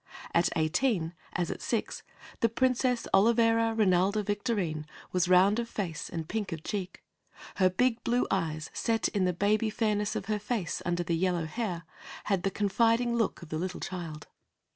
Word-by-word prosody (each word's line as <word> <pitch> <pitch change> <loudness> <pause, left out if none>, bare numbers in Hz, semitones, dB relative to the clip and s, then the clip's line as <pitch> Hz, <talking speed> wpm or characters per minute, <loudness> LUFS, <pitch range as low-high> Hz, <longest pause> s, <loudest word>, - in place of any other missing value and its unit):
At 170 +1 +3
eighteen, 165 +1 +1 0.2
as 175 -1 -1
at - - -6
six, - - -2 0.4
the 230 - +3
Princess 250 0 +1
Olivera 230 +2 +4
Rinalda 200 0 +3
Victorine 200 -8 -1 0.2
was 180 -1 +1
round 190 +4 +5
of 235 -1 -3
face 170 -6 -4
and 165 -2 -5
pink 210 -1 -3
of 160 -2 -5
cheek. 195 -3 -4 0.5
Her 185 -1 +5
big 235 +5 +1
blue 245 +1 +2
eyes, 160 -5 -1
set 225 -5 0
in 195 -3 0
the 180 - +2
baby 215 +5 +2
fairness 210 -1 0
of - - -3
her 210 0 -1
face 210 -5 -2
under 175 0 0
the 170 0 0
yellow 175 -1 0
hair, 180 -1 -3 0.4
had 195 -3 0
the 195 - +1
confiding 230 +5 +2
look 225 -6 0
of 155 - -9
a - - 0
little 180 +2 -3
child. 165 -5 -6
195 Hz, 170 wpm, -29 LUFS, 175-225 Hz, 0.5 s, round